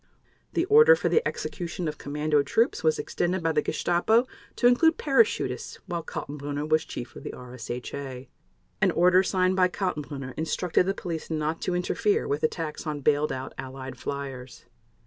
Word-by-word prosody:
The 340 - +1
order 460 +4 +7
for - - -1
the 460 - +4
execution 175 -1 -4
of 150 - -4
commando 150 +1 +1
troops 225 - +1
was 155 -1 +3
extended 175 0 -1
by 165 - +2
the 150 -1 +2
Gestapo 220 - +2 0.3
to - - -1
include 320 +7 +5
parachutists 230 - +1
while 175 -3 -3
Kaltenbrunner 145 -1 -5
was 155 0 +2
Chief 120 +1 -7
of - - -9
the - - -6
RSHA. 125 +2 -7 0.5
An - - +5
order 180 +2 +5
signed 185 -1 +1
by 185 -1 +4
Kaltenbrunner 150 -8 -4
instructed 175 +3 +1
the 195 - 0
police 170 -5 -5
not 155 0 -2
to 180 - -1
interfere 185 +3 +1
with 145 +2 -1
attacks 155 0 -2
on 150 -1 -3
bailed 150 +2 +2
out 130 0 -5
Allied 130 0 -7
fliers. 135 -3 -6
155 Hz, 165 wpm, -27 LUFS, 140-185 Hz, 0.5 s, order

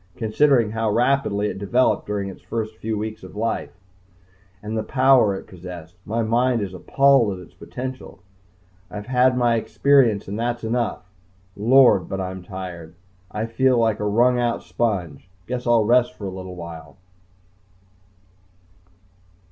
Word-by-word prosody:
Considering 115 0 +2
how 115 0 -1
rapidly 120 -3 +1
it 95 - -5
developed 120 +6 +1
during 100 -1 -2
its 95 - -9
few 110 -1 -4
weeks 110 +1 -5
of 95 +1 -12
life, 115 +2 -2 0.9
and 110 +1 -4
the 110 - 0
power 130 -4 +3
it - - -8
possessed, 90 -2 -10
my 115 +2 -1
mind 120 +2 +1
is 100 -3 -4
appalled 135 +3 +3
at 90 - -10
its - - -23
potential. 130 +1 -8 0.7
I've 105 +2 -7
had 125 0 +2
my 120 -2 +2
experience 120 -3 +2
and 100 +3 -5
that's 120 0 -2
enough. 115 -5 -2 0.5
Lord! 115 -4 +4
but 95 - -3
I'm 95 0 -5
tired. 90 -3 -8 0.3
I 105 +1 -3
feel 125 +3 +2
like 110 -2 +1
a 105 - -2
wrung 120 +4 +3
out 120 -1 -1
sponge. 90 -8 -3 0.2
Guess 125 +2 -4
I'll 115 -2 +4
rest 120 -4 +3
for 100 - -8
a 95 - -4
little 95 -1 -8
while 85 -1 -10
110 Hz, 150 wpm, -22 LUFS, 95-120 Hz, 0.9 s, Lord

